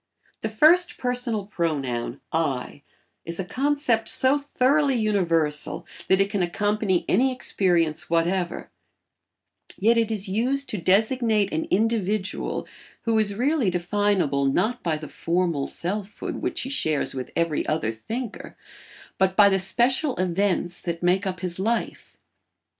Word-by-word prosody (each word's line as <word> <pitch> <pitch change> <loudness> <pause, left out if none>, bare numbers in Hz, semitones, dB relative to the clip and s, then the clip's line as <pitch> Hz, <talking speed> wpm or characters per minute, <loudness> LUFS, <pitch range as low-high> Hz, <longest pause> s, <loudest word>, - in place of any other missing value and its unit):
The 220 - -3
first 345 +10 +4
personal 245 -4 -2
pronoun 140 - -2
"I" 145 -4 -2 0.4
is 170 +1 -5
a 190 - -2
concept 270 -1 0
so 265 +2 +3
thoroughly 280 0 +2
universal 170 -9 0 0.2
that 190 - +3
it 195 +1 +1
can 205 -3 0
accompany 205 +1 0
any 260 +7 +3
experience 170 -10 0
whatever, 175 +2 0 1.1
yet 230 +4 +3
it 225 -1 +1
is 210 -2 -3
used 255 +8 -1
to 210 - -3
designate 215 +3 +2
an 160 - -1
individual 215 -1 -1 0.4
who 225 -2 +2
is 205 -2 0
really 260 -1 +1
definable 180 -5 +1
not 215 - +1
by 160 -3 -1
the 155 0 -8
formal 170 -4 -1
selfhood 200 +3 -4
which - - -2
he 265 - -4
shares 155 - 0
with 130 -1 -5
every 165 -3 0
other 155 -8 0
thinker, 225 - -6 0.6
but 190 0 +2
by 205 -1 +7
the 195 -1 +2
special 250 - +2
events 180 -1 0
that 170 -1 -4
make 185 +3 +2
up 185 -1 -4
his 180 -1 -4
life. 225 +4 -2
195 Hz, 135 wpm, -24 LUFS, 170-230 Hz, 1.1 s, by